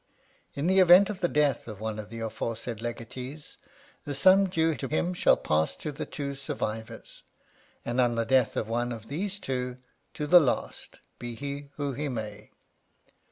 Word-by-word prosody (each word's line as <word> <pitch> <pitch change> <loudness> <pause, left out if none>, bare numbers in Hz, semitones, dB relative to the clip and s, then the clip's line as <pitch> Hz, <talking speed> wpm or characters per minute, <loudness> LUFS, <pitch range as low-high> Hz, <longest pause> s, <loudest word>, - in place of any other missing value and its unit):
In 140 - -2
the 190 +2 +4
event 185 +3 +7
of 195 - -7
the 175 - +2
death 145 -7 +1
of 105 -3 -8
one 110 0 -3
of 105 -1 -7
the 115 +1 -7
aforesaid 115 +1 -4
legatees, 125 +5 -7 0.4
the 145 - -4
sum 190 +7 +6
due 165 -2 +2
to 135 - -4
him 170 +5 0
shall - - +4
pass 80 +1 0
to 150 - -5
the 145 - -6
two 140 -2 -4
survivors, 110 -5 -5 0.6
and 120 +2 +1
on 120 -1 +2
the 115 0 0
death 130 0 +2
of 110 - -1
one 120 +2 -1
of 110 -2 -8
these 190 +7 -3
two, 125 -6 -3 0.4
to 150 - -2
the 175 +4 +8
last, 140 -7 -2 0.2
be 120 -1 -5
he 140 +2 -6
who 145 -2 -2
he 145 +3 -3
may. 105 -4 -6
130 Hz, 180 wpm, -28 LUFS, 115-150 Hz, 0.6 s, the